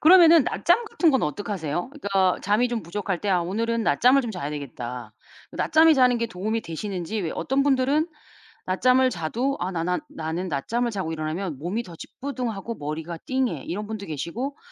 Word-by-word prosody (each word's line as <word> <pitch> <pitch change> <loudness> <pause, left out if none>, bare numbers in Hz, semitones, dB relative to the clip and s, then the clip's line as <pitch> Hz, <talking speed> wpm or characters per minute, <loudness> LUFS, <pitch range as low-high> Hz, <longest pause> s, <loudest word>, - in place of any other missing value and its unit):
그러면은 335 -2 +8
낮잠 405 +7 +2
같은 345 -6 +2
건 265 - +2
어떻게 205 +9 -3
하세요? 175 - -3
그러니까 195 -10 +1
잠이 215 +5 +2
좀 235 -4 -2
부족할 180 +1 -3
때 205 - -3
'아 180 -2 +3
오늘은 230 +5 -1
낮잠을 250 - +4
좀 235 - -4
자야 170 -7 -4
되겠다.' 125 -5 -6 0.4
낮잠이 320 0 +5
자는 250 -2 +4
게 230 - 0
도움이 220 +2 -2
되시는지. 185 +4 -4
왜 165 - -2
어떤 270 +1 0
분들은 285 +4 +2 0.6
낮잠을 255 +7 +3
자도 245 - -2
아 185 - -2
나 165 -2 -2
난 180 +1 0
"나는 165 +3 -4
낮잠을 235 - -1
자고 185 -6 -3
일어나면 155 0 -3
몸이 195 +9 -2
더 170 -5 -11
찌뿌둥하고, 235 - -5
머리가 160 +2 -5
띵해." 255 - -1
이런 205 +5 -4
분도 215 -2 -5
계시고 210 - -4
205 Hz, 395 characters per minute, -25 LUFS, 170-255 Hz, 0.6 s, 그러면은